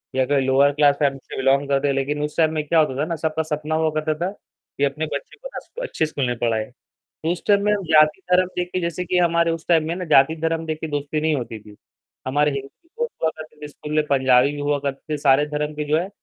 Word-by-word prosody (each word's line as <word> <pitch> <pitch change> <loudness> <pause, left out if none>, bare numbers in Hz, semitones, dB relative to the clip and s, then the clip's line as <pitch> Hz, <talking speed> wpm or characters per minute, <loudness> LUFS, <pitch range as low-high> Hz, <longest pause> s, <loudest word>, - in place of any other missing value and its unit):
या 130 -1 +2
कोई 140 0 +2
lower 140 +2 +4
class 145 -1 +4
family 140 -2 +1
से - - -9
बिलॉन्ग 135 +1 +2
करते 140 +1 +2
हैं, 140 - +1
लेकिन 145 +2 -1
उस 150 - -5
टाइम 160 -1 +3
में 155 -1 -1
क्या 165 0 +3
होता 140 -4 +2
था - - +1
ना, 165 0 -3
सबका 160 0 -1
सपना 155 0 -3
हुआ 160 0 +2
करता 155 0 -1
था 190 - -2 0.5
कि 140 - 0
अपने 140 +3 0
बच्चे 140 - -6
को - - -8
ना - - -4
स - - -33
अच्छे 160 - -1
स्कूल 145 -3 -3
में 120 - -1
पढ़ाएँ, 110 -1 -1 0.6
उस 180 - -6
टाइम 200 -1 +4
में 210 - +3
हम 200 -3 -1
जाति-धर्म 180 +4 +4
देख 180 0 -1
के 185 - -1
जैसे 170 +1 -3
कि 180 +1 0
हमारे 170 -1 +3
उस 165 0 -4
टाइम 160 -2 +3
में 170 - -1
ना 180 - -4
जाति-धर्म 160 +2 +2
देख 155 -1 -3
के 160 - -3
दोस्ती 145 +1 -2
नहीं 155 0 +1
होती 120 -4 -4
थी, 105 0 -15 0.5
हमारे 145 +3 +2
हिंदी 135 0 -5 0.3
दोस्त 475 0 -2
हुआ 160 - +3
करते 155 -1 -11
थे 150 - -6
स्कूल 150 +1 -9
में, 155 -1 +3
पंजाबी 130 0 +4
भी 145 - -6
हुआ 145 0 0
करते 140 +2 -5
थे, - - 0
सारे 145 0 +4
धर्म 150 0 -3
के 150 0 -3
जो 155 - +3
है 180 +3 -2
150 Hz, 265 wpm, -22 LUFS, 140-160 Hz, 0.6 s, lower